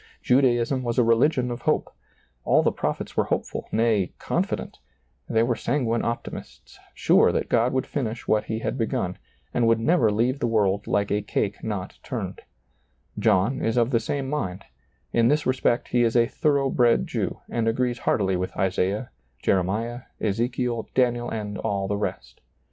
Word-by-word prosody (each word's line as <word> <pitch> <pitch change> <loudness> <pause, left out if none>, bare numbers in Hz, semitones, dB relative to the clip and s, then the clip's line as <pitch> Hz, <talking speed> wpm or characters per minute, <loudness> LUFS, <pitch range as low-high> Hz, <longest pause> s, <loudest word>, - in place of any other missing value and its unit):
Judaism 125 0 +3
was 120 -2 -2
a 125 - +5
religion 125 +2 +3
of 120 0 -5
hope; - - 0 0.5
all - - +4
the - - +3
prophets - - -3
were - - +2
hopeful, - - -3
nay, 110 -5 +1
confident; - - -2 0.5
they 115 0 +3
were 120 0 +1
sanguine 120 -1 0
optimists, 115 0 -6 0.2
sure - - +4
that - - -2
God 120 +1 +3
would 130 -1 0
finish 120 -4 -4
what 105 -1 +2
He 110 - -3
had 130 - -2
begun, 95 -5 -1 0.3
and 120 -2 +2
would 115 0 +4
never 115 -3 +3
leave 120 +6 +1
the - - 0
world 100 -3 +1
like 100 0 0
a 105 - +1
cake 105 0 -2
not 105 -4 -4
turned, - - -5 0.8
John 110 +4 +2
is 115 +1 0
of 120 +1 +3
the 115 - +3
same 135 +4 -3
mind; 100 -10 -3 0.5
in 115 -1 +4
this 150 +3 +2
respect 130 -2 +1
he 120 - +2
is 115 -1 +2
a 120 -1 +5
thorough 140 +1 +1
bred 120 -2 +3
Jew, - - -3
and 115 -1 -1
agrees 120 +1 0
heartily 95 -3 +1
with 90 +1 -3
Isaiah, 95 +4 0 0.3
Jeremiah, 105 +6 0 0.2
Ezekiel, 120 +2 -1
Daniel, 120 -1 +2
and 105 -2 -4
all 100 -3 -1
the 100 - -1
rest. 65 -11 -5
115 Hz, 170 wpm, -25 LUFS, 105-125 Hz, 0.8 s, a